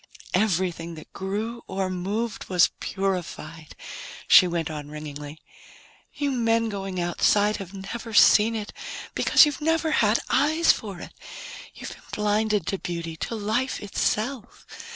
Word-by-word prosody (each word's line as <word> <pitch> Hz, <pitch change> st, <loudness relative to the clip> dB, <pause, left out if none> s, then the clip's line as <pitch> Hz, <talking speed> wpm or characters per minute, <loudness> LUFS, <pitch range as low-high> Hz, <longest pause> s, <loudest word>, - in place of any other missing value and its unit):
"Everything 180 Hz, -4 st, 0 dB
that 155 Hz, -, -13 dB
grew 215 Hz, +5 st, -4 dB
or 190 Hz, 0 st, -2 dB
moved 200 Hz, +5 st, -3 dB
was 180 Hz, -2 st, +4 dB
purified," 175 Hz, -5 st, -4 dB, 0.5 s
she 185 Hz, -, +8 dB
went 170 Hz, -2 st, -2 dB
on 150 Hz, -1 st, -6 dB
ringingly. 150 Hz, 0 st, -8 dB, 0.8 s
"You 285 Hz, -1 st, -1 dB
men 230 Hz, -2 st, +1 dB
going 195 Hz, -3 st, -4 dB
outside 205 Hz, +4 st, +2 dB
have 190 Hz, -2 st, -8 dB
never 200 Hz, +4 st, -7 dB
seen 220 Hz, +1 st, +6 dB
it, 210 Hz, -1 st, -5 dB, 0.4 s
because -, -, +6 dB
you've 295 Hz, 0 st, -3 dB
never 325 Hz, +1 st, +1 dB
had 215 Hz, -5 st, +3 dB
eyes 315 Hz, +3 st, +4 dB
for 200 Hz, -5 st, -5 dB
it. -, -, -10 dB, 0.6 s
You've -, -, -7 dB
been -, -, -12 dB
blinded 210 Hz, -2 st, +1 dB
to 195 Hz, -, -2 dB
beauty, 170 Hz, -2 st, -4 dB
to 230 Hz, -, -4 dB
life 220 Hz, +5 st, -1 dB
itself. 215 Hz, +4 st, -2 dB
200 Hz, 135 wpm, -25 LUFS, 175-225 Hz, 0.8 s, she